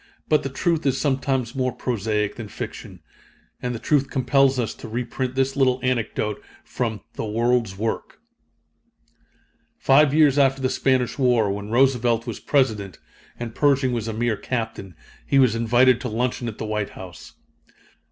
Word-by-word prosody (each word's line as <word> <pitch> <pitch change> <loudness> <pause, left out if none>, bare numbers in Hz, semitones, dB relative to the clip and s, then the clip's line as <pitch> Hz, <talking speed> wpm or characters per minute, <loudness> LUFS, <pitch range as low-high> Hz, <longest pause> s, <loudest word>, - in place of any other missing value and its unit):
But 150 - +3
the 135 - -4
truth 165 +4 0
is 135 0 +1
sometimes 130 -4 0
more 130 -1 0
prosaic 105 -4 -2
than 115 -2 -6
fiction; - - -8 0.6
and 125 -1 -3
the - - -3
truth 140 +3 +1
compels 135 0 +2
us 120 -3 -1
to - - -10
reprint 125 +2 -3
this 135 0 0
little 130 -2 +2
anecdote 110 -4 -1 0.2
from 115 -4 -3
The - - -4
World's 115 -2 0
Work. 110 +2 -3 1.6
Five 140 +1 +4
years 150 -2 +4
after 135 -1 +3
the 130 -1 0
Spanish 130 -2 0
War, 120 -6 +3
when 100 +1 -5
Roosevelt 120 -2 +2
was - - -5
President 110 -9 0 0.4
and 120 -1 -5
Pershing 140 -2 +2
was 115 -2 -2
a 110 - -3
mere 115 -1 0
Captain, 110 -7 -4 0.3
he 140 - +1
was 130 -5 +5
invited 120 +2 +3
to 125 - -3
luncheon 120 +2 -2
at 110 - -6
the - - -4
White 105 -1 -2
House. 90 -5 -11
125 Hz, 160 wpm, -23 LUFS, 110-135 Hz, 1.6 s, was